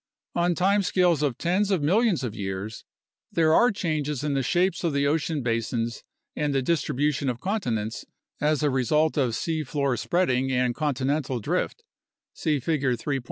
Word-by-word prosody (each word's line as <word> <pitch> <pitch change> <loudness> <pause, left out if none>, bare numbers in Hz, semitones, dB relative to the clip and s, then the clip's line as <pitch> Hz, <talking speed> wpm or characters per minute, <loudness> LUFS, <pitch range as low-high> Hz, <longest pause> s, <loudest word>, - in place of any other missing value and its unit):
On 175 0 +1
time 200 +3 +3
scales 180 -5 +2
of 140 -5 0
tens 185 +4 +1
of 185 -7 +1
millions 195 - +2
of 120 -4 -3
years 100 +2 -5 0.5
there 160 -1 +3
are 240 +8 +5
changes 150 - -2
in 150 -1 0
the 135 - +1
shapes 180 +9 +1
of 165 -3 0
the 140 0 +1
ocean 150 -1 0
basins 115 0 -2 0.3
and 145 -2 -1
the 135 - +1
distribution 145 -2 0
of 120 -1 -3
continents 120 - -2 0.4
as 150 0 +1
a 145 - +3
result 150 +5 +2
of 125 -6 +1
sea 160 -2 -1
floor 140 -2 0
spreading 135 -4 +1
and 125 -1 +1
continental 140 -2 -1
drift 180 - -2 0.5
(see 150 -3 0
Figure 135 -3 0
3. 135 +4 -2
145 Hz, 165 wpm, -26 LUFS, 125-170 Hz, 0.5 s, are